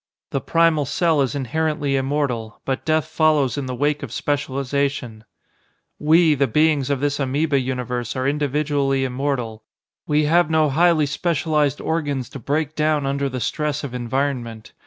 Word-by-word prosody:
The 135 - -1
primal 165 -3 +2
cell 160 +2 +1
is 135 +1 -1
inherently 145 +1 -1
immortal, 135 -5 -2
but 135 -1 -2
death 155 -2 +2
follows 150 -6 +2
in 140 -2 -4
the 130 - -3
wake 145 +3 0
of 135 -6 -6
specialization. 135 -4 -2 0.7
"We, 160 +1 +4
the 140 -1 +1
beings 150 +1 +2
of 140 -2 0
this 145 0 0
amoeba 140 +2 +1
universe, 125 -2 -3
are 130 0 -1
individually 145 -1 0
immortal. 125 -4 -3 0.4
We 150 0 +2
have 165 +2 +3
no 155 -2 +2
highly 165 0 +3
specialized 150 -1 0
organs 145 -6 -2
to 135 - -8
break 150 +4 -1
down 150 -2 +1
under 140 0 -1
the 130 -1 -4
stress 150 +3 -2
of 135 -3 -5
environment. 120 -3 -3
140 Hz, 155 wpm, -21 LUFS, 130-150 Hz, 0.7 s, We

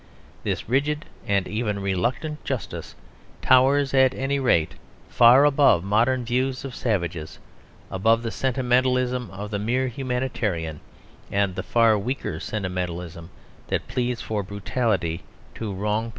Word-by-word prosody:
This - - -3
rigid 145 +6 0 0.2
and 100 -2 +1
even 105 -2 -2
reluctant 120 - -2
justice 130 -5 -5 0.5
towers, 135 +2 +4
at 130 -1 +4
any 140 +1 -1
rate, 85 - +2 0.4
far 125 +4 +7
above 140 - +4
modern 120 +5 +2
views 130 +2 -1
of 135 - -6
savages, 85 -10 -2 0.5
above 115 +5 +2
the 115 - -3
sentimentalism 125 -1 +1
of 100 +2 -7
the 100 - -1
mere 125 +5 0
humanitarian 120 - -2 0.5
and 100 -1 +1
the - - -3
far 115 -3 +3
weaker 115 -7 -3
sentimentalism 90 -4 -4 0.4
that - - -2
pleads 125 -1 -2
for 105 -2 -2
brutality 100 -3 -1 0.3
and - - -12
a 110 - -2
race 95 - -5
war. 105 +2 -1
115 Hz, 135 wpm, -24 LUFS, 100-130 Hz, 0.5 s, far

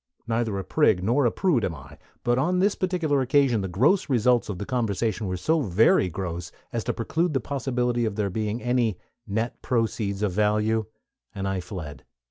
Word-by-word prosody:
Neither 115 -3 -1
a 95 - -3
prig 105 - +2
nor 120 +6 +3
a - - +1
prude 155 - +1
am 85 -4 -1
I; 70 +1 -13 0.2
but 120 +1 +2
on 175 +7 +1
this 200 +3 +3
particular 170 -7 0
occasion 130 -4 +3
the 95 - -2
gross 130 - +2
results 125 -2 +2
of 100 - -3
the 100 - -5
conversation 110 -3 -1
were 90 0 -2
so 160 - +1
very 95 -3 +3
gross 85 0 -5 0.2
as 115 -2 -1
to - - 0
preclude 160 +7 -1
the - - +3
possibility 125 -2 -1
of 110 - -2
there 100 -2 -1
being 110 +3 -2
any 120 -6 +1 0.3
"net 110 +4 -2
proceeds" 110 -4 -1
of 105 - +1
value, 105 +2 +1 0.5
and 95 -1 -3
I 95 -1 -1
fled. 85 -5 -7
115 Hz, 190 wpm, -25 LUFS, 100-130 Hz, 0.5 s, nor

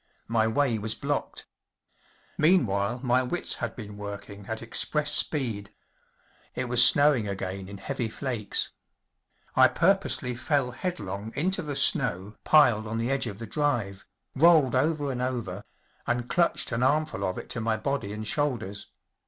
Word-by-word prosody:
My 110 -1 +2
way 115 0 +1
was 110 +1 -2
blocked. 145 0 -3 0.9
Meanwhile 120 - +2
my 125 0 +3
wits 150 +8 -1
had 115 -3 -4
been 105 -3 -9
working 100 0 -8
at 110 0 -5
express 145 +6 0
speed. 115 -11 -1 0.8
It 130 - -2
was 120 0 +6
snowing 145 -7 +5
again 95 -1 -5
in 100 - -8
heavy 110 +4 -3
flakes. 115 -3 -1 0.8
I - - +7
purposely 170 -7 +1
fell 130 +1 0
headlong 110 - -5
into 185 +6 +1
the 145 -2 -5
snow 105 -8 +1
piled 120 -8 +4
on 110 +1 -3
the 115 +3 -1
edge 135 -2 0
of 100 -3 -6
the 115 - -7
drive, 115 -7 -1 0.3
rolled 155 -3 +5
over 145 +1 +1
and 125 -1 -4
over, 115 -7 -3 0.4
and 120 0 -1
clutched 170 -2 +1
an 115 0 -1
armful 150 +4 +1
of 95 - -2
it - - -7
to 115 - -3
my 110 0 0
body 120 -3 -2
and 105 +1 -5
shoulders. 105 -7 -2
120 Hz, 155 wpm, -27 LUFS, 105-145 Hz, 0.9 s, I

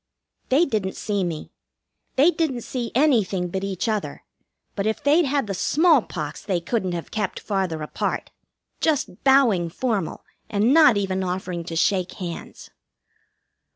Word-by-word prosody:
They 290 +7 +4
didn't 210 - -2
see 205 -3 -1
me. 165 -3 -4 0.6
They 295 +6 +5
didn't 310 -8 -1
see 240 0 -4
anything 215 -11 +2
but 190 +2 -3
each 195 +1 -2
other; 215 -2 -2 0.5
but 200 0 -1
if 220 - -2
they'd 305 +4 +4
had 280 -1 0
the 200 - -3
smallpox 245 - +1
they 195 -3 -1
couldn't 185 +1 -2
have 170 -1 -5
kept 210 -3 -2
farther 185 -6 -2
apart, 150 - -3 0.5
just 305 -2 -1
bowing 245 -11 +4
formal, 210 -2 -2 0.2
and 215 +5 +2
not 300 -8 +6
even 190 -1 -1
offering 180 -1 -3
to 165 - -5
shake 185 +2 +1
hands. 175 -3 -8
205 Hz, 145 wpm, -23 LUFS, 180-265 Hz, 0.6 s, not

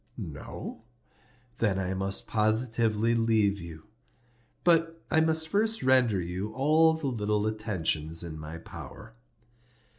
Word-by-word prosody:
No? 110 - -7 0.8
Then 105 -4 +1
I 95 -1 -2
must 95 +1 -1
positively 110 0 +1
leave 110 -3 +2
you. 85 -2 -10 0.8
But 165 -1 +3
I 160 -2 +5
must 160 0 +2
first 220 +5 0
render 130 -6 +4
you 90 +4 -4
all 155 +5 +4
the 160 -2 -6
little 105 -5 0
attentions 85 -7 -1
in 80 -2 -7
my 75 +2 -7
power." 110 +6 -11
110 Hz, 120 wpm, -28 LUFS, 95-135 Hz, 0.8 s, I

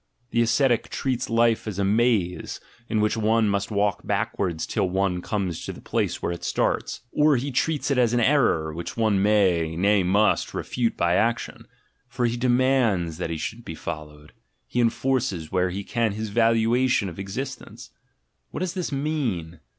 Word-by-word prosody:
The 120 - +2
ascetic 120 +1 +2
treats 130 -3 -2
life 115 -1 +2
as 105 -3 -4
a 100 - 0
maze, 100 -5 +1 0.3
in 110 - +1
which 105 +2 +1
one 110 0 +2
must 100 -1 0
walk 105 -1 0
backwards 85 -5 -1
till 95 - -1
one 95 -1 0
comes 95 -4 -3
to - - -4
the - - -12
place - - -2
where - - 0
it 85 0 -6
starts; - - -1
or 150 -1 +4
he 140 +4 -3
treats 145 +3 0
it 135 - +2
as 120 -2 +3
an 120 - +2
error 115 - +2
which 85 +7 -6
one 110 -4 +2
may, 95 -6 +2
nay 100 +3 +3
must, 100 +4 +2
refute 120 -2 -1
by 85 0 +2
action: 115 +5 -1 0.4
for 125 -1 -2
he 120 0 0
de 125 +1 0
mands 120 -10 +2
that 90 - -2
he 80 - -3
should 110 +9 -5
be 80 - -7
followed; 75 -2 -8 0.3
he 125 - -1
enforces, 115 -8 0
where 90 0 +1
he 100 +3 -4
can, 115 -1 0
his 110 +1 -4
valuation 115 +1 +2
of 85 0 -8
existence. 125 +7 -6 0.6
What - - -6
does 185 -2 -2
this 180 -4 -3
mean? 130 - -2
110 Hz, 180 wpm, -24 LUFS, 90-120 Hz, 0.6 s, or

